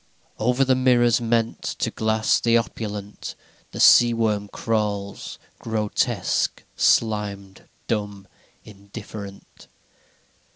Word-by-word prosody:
III 110 Hz, -, -2 dB
Over 125 Hz, +2 st, +3 dB
the 130 Hz, -, +3 dB
mirrors 120 Hz, -2 st, +3 dB
meant 115 Hz, -1 st, 0 dB
To -, -, -3 dB
glass 110 Hz, 0 st, +1 dB
the 115 Hz, 0 st, +3 dB
opulent 105 Hz, -3 st, -5 dB, 0.3 s
The -, -, -9 dB
sea 120 Hz, -1 st, +7 dB
worm 105 Hz, -3 st, 0 dB
crawls 105 Hz, -2 st, -3 dB, 0.2 s
grotesque, 110 Hz, -2 st, -1 dB
slimed, 100 Hz, -3 st, 0 dB, 0.2 s
dumb, 105 Hz, -3 st, -3 dB, 0.4 s
indifferent. 100 Hz, -1 st, -11 dB
110 Hz, 95 wpm, -23 LUFS, 100-115 Hz, 0.4 s, sea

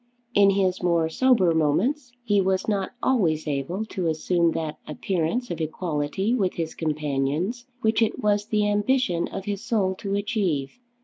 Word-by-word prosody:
In 200 Hz, -1 st, +6 dB
his 190 Hz, -2 st, +1 dB
more 170 Hz, -2 st, +2 dB
sober 225 Hz, -4 st, +3 dB
moments 240 Hz, -, +1 dB
he 205 Hz, -4 st, +2 dB
was 190 Hz, 0 st, 0 dB
not 200 Hz, -3 st, -1 dB
always 165 Hz, -12 st, +1 dB
able 150 Hz, +9 st, -2 dB
to 185 Hz, -5 st, -3 dB
assume 165 Hz, +1 st, +1 dB
that 155 Hz, -2 st, -4 dB
appearance 185 Hz, +9 st, -2 dB
of 170 Hz, -, -4 dB
equality 160 Hz, +5 st, -1 dB
with 200 Hz, -7 st, 0 dB
his 165 Hz, -2 st, -3 dB
companions 155 Hz, -, -2 dB
which 220 Hz, +1 st, +2 dB
it 225 Hz, -, +1 dB
was 205 Hz, 0 st, +1 dB
the 210 Hz, -2 st, +1 dB
ambition 205 Hz, -3 st, +1 dB
of 195 Hz, -, -6 dB
his 205 Hz, 0 st, -3 dB
soul 215 Hz, -6 st, +1 dB
to 200 Hz, -1 st, -2 dB
achieve. 200 Hz, -, -1 dB
190 Hz, 160 wpm, -25 LUFS, 160-215 Hz, -, In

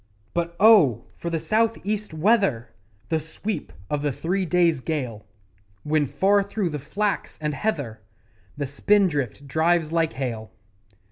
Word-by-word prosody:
But 170 Hz, 0 st, -2 dB
oh! 190 Hz, -, +6 dB
for 170 Hz, -, -5 dB
the 165 Hz, -, -1 dB
South 225 Hz, +6 st, +1 dB
east 210 Hz, -1 st, -2 dB
weather 160 Hz, -, +2 dB, 0.4 s
The 160 Hz, -1 st, +1 dB
sweep 165 Hz, +3 st, -5 dB, 0.2 s
of 150 Hz, -1 st, -2 dB
the 145 Hz, -1 st, 0 dB
three 180 Hz, +7 st, -1 dB
days' 170 Hz, -3 st, +3 dB
gale 125 Hz, -9 st, -4 dB, 0.6 s
When, 150 Hz, -1 st, +1 dB
far 200 Hz, +8 st, +3 dB
through 200 Hz, -3 st, -2 dB
the 150 Hz, -, -3 dB
flax 200 Hz, +8 st, -2 dB
and 150 Hz, -1 st, -2 dB
heather, 140 Hz, -, -2 dB, 0.6 s
The 145 Hz, -, -2 dB
spindrift 145 Hz, -, +1 dB
drives 160 Hz, +1 st, +2 dB
like 165 Hz, -1 st, +1 dB
hail. 115 Hz, -5 st, -4 dB
160 Hz, 140 wpm, -24 LUFS, 145-200 Hz, 0.6 s, oh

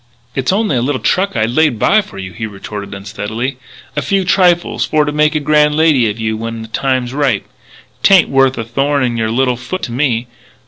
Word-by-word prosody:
"It's 135 Hz, +3 st, 0 dB
only 205 Hz, -6 st, +1 dB
a 120 Hz, -, +1 dB
little 130 Hz, +1 st, -1 dB
truck 185 Hz, -, 0 dB
I'd 110 Hz, 0 st, 0 dB
laid 150 Hz, -2 st, +2 dB
by 215 Hz, -, +3 dB
for 195 Hz, -, -13 dB
you," 95 Hz, -2 st, -7 dB
he 110 Hz, +6 st, -4 dB
retorted 100 Hz, 0 st, -8 dB
unsteadily, 110 Hz, +6 st, -4 dB, 0.2 s
" -, -, -22 dB
a 150 Hz, -, 0 dB
few 190 Hz, +7 st, 0 dB
trifles 175 Hz, -2 st, +2 dB
for 150 Hz, -1 st, +1 dB
to 145 Hz, -, -1 dB
make 150 Hz, +1 st, +2 dB
a -, -, +2 dB
grand 150 Hz, 0 st, +3 dB
lady 150 Hz, -8 st, +3 dB
of 105 Hz, +2 st, -5 dB
you 110 Hz, 0 st, -1 dB
when 115 Hz, 0 st, -5 dB
the 110 Hz, -, -11 dB
time's 130 Hz, 0 st, -1 dB
ripe. 145 Hz, -1 st, 0 dB, 0.6 s
'Tain't 195 Hz, -3 st, +5 dB
worth 135 Hz, -1 st, +3 dB
a 115 Hz, -, -2 dB
thorn 135 Hz, +5 st, 0 dB
in 120 Hz, -2 st, 0 dB
your 110 Hz, -1 st, -1 dB
little 125 Hz, +1 st, +1 dB
foot 185 Hz, +10 st, -5 dB
to 120 Hz, -, -3 dB
me.... 120 Hz, -2 st, 0 dB
130 Hz, 220 wpm, -15 LUFS, 115-150 Hz, 0.6 s, Tain't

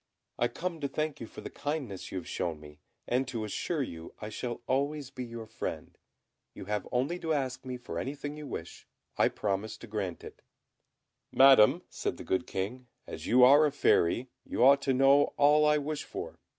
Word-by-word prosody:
I 120 Hz, -, +3 dB
come 170 Hz, +4 st, -4 dB
to 140 Hz, -, 0 dB
thank 155 Hz, +1 st, -3 dB
you 115 Hz, -, -7 dB
for -, -, -10 dB
the -, -, -8 dB
kindness 145 Hz, -, -4 dB
you -, -, -4 dB
have 90 Hz, -, -6 dB
shown 80 Hz, -3 st, -3 dB
me, 75 Hz, 0 st, -14 dB, 0.3 s
and 125 Hz, +1 st, +1 dB
to 115 Hz, -3 st, -3 dB
assure 140 Hz, -, -2 dB
you 80 Hz, -8 st, -8 dB
I 105 Hz, -, -6 dB
shall 120 Hz, +3 st, -5 dB
always 140 Hz, +1 st, -1 dB
be 130 Hz, -2 st, -6 dB
your 115 Hz, -2 st, -7 dB
friend. 110 Hz, -, -6 dB, 0.6 s
You -, -, -8 dB
have 105 Hz, -1 st, -2 dB
only 135 Hz, +8 st, 0 dB
to 160 Hz, -2 st, -1 dB
ask 130 Hz, -2 st, -2 dB
me 130 Hz, -1 st, -5 dB
for 125 Hz, -, -6 dB
anything 145 Hz, +2 st, -5 dB
you 150 Hz, -1 st, -8 dB
wish, 85 Hz, -9 st, -7 dB, 0.3 s
I -, -, +4 dB
promise 100 Hz, +1 st, -3 dB
to -, -, -10 dB
grant 105 Hz, -5 st, -4 dB
it." -, -, -11 dB, 0.9 s
"Madam," 135 Hz, -5 st, +7 dB
said -, -, -4 dB
the -, -, -8 dB
good 95 Hz, -, -1 dB
King, 120 Hz, +7 st, -4 dB, 0.2 s
"as 80 Hz, -, -7 dB
you 125 Hz, +1 st, +6 dB
are 140 Hz, +4 st, +8 dB
a -, -, -2 dB
Fairy, 125 Hz, -3 st, +2 dB
you -, -, -1 dB
ought 140 Hz, +2 st, +7 dB
to 135 Hz, -, +1 dB
know 135 Hz, +2 st, +4 dB
all 150 Hz, +1 st, +5 dB
I 150 Hz, 0 st, +4 dB
wish 150 Hz, 0 st, -3 dB
for. -, -, -7 dB
130 Hz, 200 wpm, -30 LUFS, 105-145 Hz, 0.9 s, are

